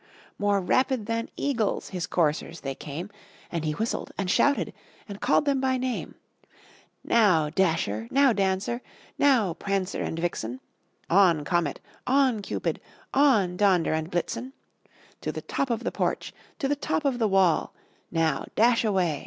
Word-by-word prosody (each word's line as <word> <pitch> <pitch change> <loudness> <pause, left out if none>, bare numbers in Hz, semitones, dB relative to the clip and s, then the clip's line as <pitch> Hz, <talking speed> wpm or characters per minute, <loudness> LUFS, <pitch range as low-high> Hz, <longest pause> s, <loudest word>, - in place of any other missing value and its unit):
More 205 -1 +2
rapid 255 +3 +1
than 230 +1 -2
eagles 235 -7 -1
his 180 -3 -3
coursers 165 0 0
they 135 -1 -3
came, 160 +8 -7 0.4
And 170 -2 -2
he 155 -1 -1
whistled, 225 +9 -3
and 190 -2 -1
shouted, 285 +7 +2 0.3
and 200 -1 -8
called - - +3
them 275 -2 +1
by 260 -1 +1
name: 255 -1 -3 0.9
"Now, 180 -10 +3
Dasher! 155 - 0
now, 275 -3 +4
Dancer! 195 +4 0 0.4
now, 245 -11 +4
Prancer 195 +2 -2
and 160 - -3
Vixen! 130 -8 -3 0.5
On, 170 -5 +4
Comet! 175 -4 0 0.3
on, 260 -4 +3
Cupid! - - -3 0.3
on, 225 -11 +4
Donder 185 -6 +3
and 160 +1 -2
Blitzen! 230 +9 -3 0.7
To - - -2
the - - -7
top 275 - -2
of 235 -2 -1
the - - -1
porch! - - -2 0.2
to 275 - -1
the 290 - +1
top 295 +1 -2
of 260 -3 +1
the 225 - +3
wall! 190 -4 +3 0.4
Now 160 -4 0
dash 230 +1 +4
away! 185 -9 +1
195 Hz, 155 wpm, -26 LUFS, 170-245 Hz, 0.9 s, now